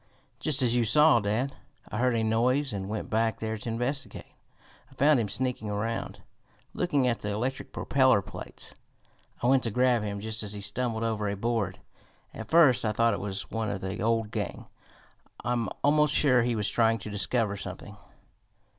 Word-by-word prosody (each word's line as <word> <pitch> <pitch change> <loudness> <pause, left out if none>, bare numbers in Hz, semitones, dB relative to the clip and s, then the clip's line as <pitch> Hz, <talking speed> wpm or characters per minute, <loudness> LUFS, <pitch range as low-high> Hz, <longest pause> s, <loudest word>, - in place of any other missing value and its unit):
"Just 150 -3 +1
as 120 -1 +2
you 120 - +3
saw, 150 +4 +5
dad. 115 +7 -1 0.4
I 105 - -3
heard 125 -1 +2
a 115 - +1
noise 125 +5 +1
and 95 -1 -4
went 110 0 -4
back 110 0 +1
there 110 0 -3
to 110 +2 -6
investigate. 125 +5 -4 0.6
I - - -18
found 140 0 +4
him 110 -3 -1
sneaking 125 -1 -2
around, 110 +3 -3 0.5
looking 145 -7 +1
at 120 -2 0
the 105 - -4
electric 120 +6 -3
propeller 130 -7 +3
plates. - - -9 0.7
I - - +1
went 130 +1 +4
to - - 0
grab 125 +1 +2
him 100 -1 -4
just 110 +1 -4
as 105 -1 -4
he 100 - -6
stumbled 115 +2 -2
over 110 -2 -1
a 100 - -3
board. 110 -3 -1 0.6
At - - -8
first 160 -7 +5
I 110 -1 0
thought 115 +1 +3
it - - -3
was 100 -1 -5
one 110 -1 -2
of 100 -2 -4
the 95 +2 -4
old 115 -1 0
gang. - - -4 0.8
I'm 120 -3 0
almost 150 +1 +3
sure 130 -4 +4
he 120 0 0
was 105 -2 0
trying 115 -1 +2
to 105 0 -8
discover 105 +1 0
something." 100 +1 -8
115 Hz, 185 wpm, -28 LUFS, 105-125 Hz, 0.8 s, saw